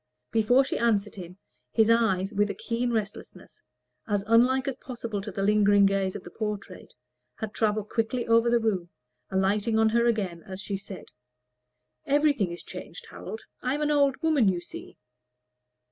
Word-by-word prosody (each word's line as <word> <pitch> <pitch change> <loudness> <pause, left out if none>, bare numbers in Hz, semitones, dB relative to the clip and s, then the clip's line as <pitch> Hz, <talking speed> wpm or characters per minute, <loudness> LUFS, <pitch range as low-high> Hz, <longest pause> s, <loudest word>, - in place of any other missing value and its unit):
Before 235 +4 +4
she 270 - -3
answered 210 -3 +1
him, 180 -1 -9 0.3
his 225 0 +4
eyes, 215 -4 +2
with 205 0 +1
a - - -3
keen 240 +1 -2
restlessness, 215 -2 -5 0.5
as 205 -2 0
unlike 250 +4 +3
as 270 - -1
possible 235 -6 -5
to 210 +1 -6
the 195 +1 -3
lingering 205 -1 +5
gaze 195 -1 +1
of 205 - -6
the 175 - -11
portrait, 210 -2 -6 0.4
had 220 -2 -6
travelled 215 -1 0
quickly 235 +2 -1
over 230 +1 +4
the 240 - +4
room, 200 -7 -1 0.4
alighting 205 +4 +1
on 220 0 +4
her 235 +1 +2
as 190 -4 -2
she 200 0 -4
said 195 -1 -8 1.0
"Everything 285 - +2
is 170 - -8
changed, 485 - -9
Harold. 445 - -7 0.2
I 255 +2 0
am 295 - -3
an 300 - +1
old 280 -2 +3
woman, 295 -10 +4
you 180 -2 0
see." 175 - -10
220 Hz, 165 wpm, -27 LUFS, 195-240 Hz, 1.0 s, lingering